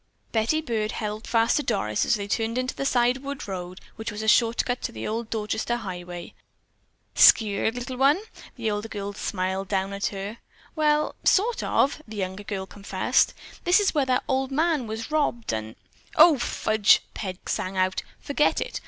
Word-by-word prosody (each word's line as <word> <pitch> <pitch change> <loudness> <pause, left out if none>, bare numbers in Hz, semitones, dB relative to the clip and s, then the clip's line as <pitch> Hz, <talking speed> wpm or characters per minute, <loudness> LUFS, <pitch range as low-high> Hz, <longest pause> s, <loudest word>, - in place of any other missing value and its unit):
Betty 230 +8 +1
Byrd 225 -7 -2
held 215 0 -4
fast 230 0 +3
to - - +1
Doris 105 - 0
as - - +4
they 200 -1 -4
turned 225 +3 -1
into 255 0 -1
the 275 - -2
side 245 0 +3
wood 280 -1 -6
road 185 -1 -6 0.2
which 220 -1 -4
was 210 +1 -5
a - - -3
shortcut 235 +2 +3
to - - -3
the 110 0 -5
old 225 +1 -3
Dorchester 220 +2 -1
highway. 180 -5 -7 0.8
"Skeered, 220 +1 +5
little 250 +1 -5
one?" 280 +6 +4 0.4
the 225 -3 -1
older 210 +1 -3
girl 205 -2 -5
smiled 190 -1 -2
down 195 0 -1
at 200 0 -1
her. 200 +3 -6 0.4
"Well, 300 -1 +2
sort 450 +5 +3
of," 285 +3 +1
the 215 -1 -8
younger 190 0 -3
girl 195 -2 -4
confessed. 200 +1 0 0.3
"This 355 +3 +5
is 410 - +2
where 285 -4 +1
that 255 -1 +1
old 265 0 0
man 305 -3 +1
was 225 +5 -5
robbed, 285 - 0
and——" 110 0 -4 0.4
"O, 310 -3 +7
fudge," 220 -3 +3
Peg 185 -3 -6
sang 190 +1 -2
out. 185 0 +1 0.2
"Forget 290 +1 +1
it! - - -4
220 Hz, 180 wpm, -25 LUFS, 200-260 Hz, 0.8 s, O